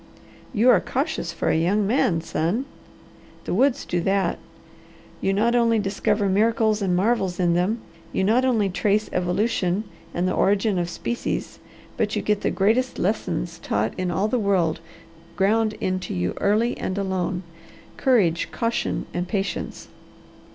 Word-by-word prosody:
"You 235 +4 +5
are - - +5
cautious 275 - -2
for - - -2
a - - +2
young 190 +6 +2
man, 195 -7 +2
son!" 170 +9 -1 0.8
"The - - -3
woods 255 +6 +2
do 175 -1 -1
that. 195 +2 0 0.8
You 195 - +1
not 220 +5 +2
only 230 -1 +3
discover 205 0 0
miracles 215 +2 +2
and 185 -3 +1
marvels 190 -2 +1
in 175 -2 +3
them, 190 +7 0 0.3
you - - 0
not 225 +6 +3
only 230 -6 +2
trace 205 +3 0
evolution 185 +1 0 0.3
and 175 +1 -1
the 185 - 0
origin 200 0 +2
of 175 0 -1
species, 235 +7 -3 0.4
but - - 0
you - - -1
get 210 -1 +1
the - - +1
greatest 230 +6 +1
lessons 175 -4 -2
taught 110 -6 -1
in 185 -1 -2
all 190 +4 +1
the 245 +3 0
world 185 -7 +1 0.6
ground 215 +3 +2
into 185 - -3
you 90 0 -1
early 215 +4 +2
and 185 - -3
alone 190 -2 -1 0.5
courage, 200 - +2
caution, 230 0 -1
and 175 +1 -2
patience." 195 0 -3
200 Hz, 150 wpm, -24 LUFS, 180-225 Hz, 0.8 s, You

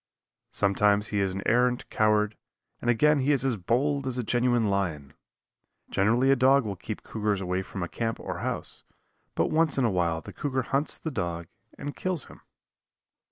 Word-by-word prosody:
Sometimes 105 +1 +2
he 105 - -1
is 95 -1 0
an 100 - -4
arrant 125 +1 +2
coward, 105 0 +2 0.5
and 120 - -1
again 150 +6 +4
he 135 +2 +2
is 135 -2 +1
as 130 -3 +1
bold 135 +8 0
as 130 -1 -3
a 125 - -1
genuine 120 +1 +2
lion. 90 -9 -1 0.8
Generally 115 +7 +3
a - - +6
dog 135 0 +4
will 100 -2 -3
keep 105 +3 -7
cougars 105 -2 -1
away 90 0 -1
from 95 0 -6
a - - -2
camp 115 +4 -3
or - - -5
house, - - -3 0.5
but - - +1
once 160 -1 +2
in 135 - +3
a 115 - +2
while 85 -3 0
the - - -11
cougar 130 -3 -2
hunts 140 +5 0
the 160 - -5
dog 85 - -3 0.3
and 145 - -6
kills 185 -7 -2
him. - - -15
115 Hz, 185 wpm, -27 LUFS, 100-130 Hz, 0.8 s, a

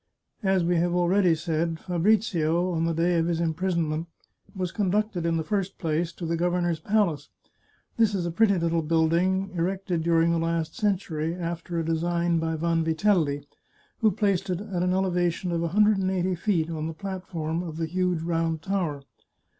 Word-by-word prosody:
As 190 -3 +2
we 175 +1 +2
have 175 +1 +1
already 180 0 +3
said, 160 0 -2
Fabrizio, 180 -2 +1
on 165 -1 0
the 165 - 0
day 170 +1 +2
of 165 - +1
his 170 -1 0
imprisonment, 165 -1 -1 0.5
was 185 -2 -2
conducted, 200 -3 0
in 165 0 +1
the 160 - -1
first 195 +1 -2
place, 165 0 -1
to 170 - -6
the 165 +1 0
gov 175 +1 0
ernor's 175 -2 0
palace. 195 -4 0 0.7
This 220 -3 +3
is 180 -3 -1
a 170 - -2
pretty 200 +2 +3
little 165 -1 +1
building 170 +4 +1
erected 180 0 -1
during 165 0 +3
the 170 - +1
last 165 -1 -1
century, 170 -6 -1
after 170 -1 -4
a 165 - -1
design 170 +1 +1
by 160 0 -1
Vanvitelli, 165 -2 +1 0.5
who 220 - +4
placed 195 -1 0
it 180 -1 -1
at 200 -4 -3
an 180 0 +1
elevation 180 -1 0
of 170 -1 0
a 170 - 0
hundred 210 +4 +4
and 185 -1 0
eighty 185 0 0
feet, 170 -3 0
on 155 -1 -3
the 165 - -6
plat 190 +1 -6
form 160 0 -2
of 165 -3 -6
the 165 - -1
huge 180 0 -1
Round 165 -1 0
Tower. 170 -7 -2
170 Hz, 185 wpm, -26 LUFS, 165-185 Hz, 0.7 s, who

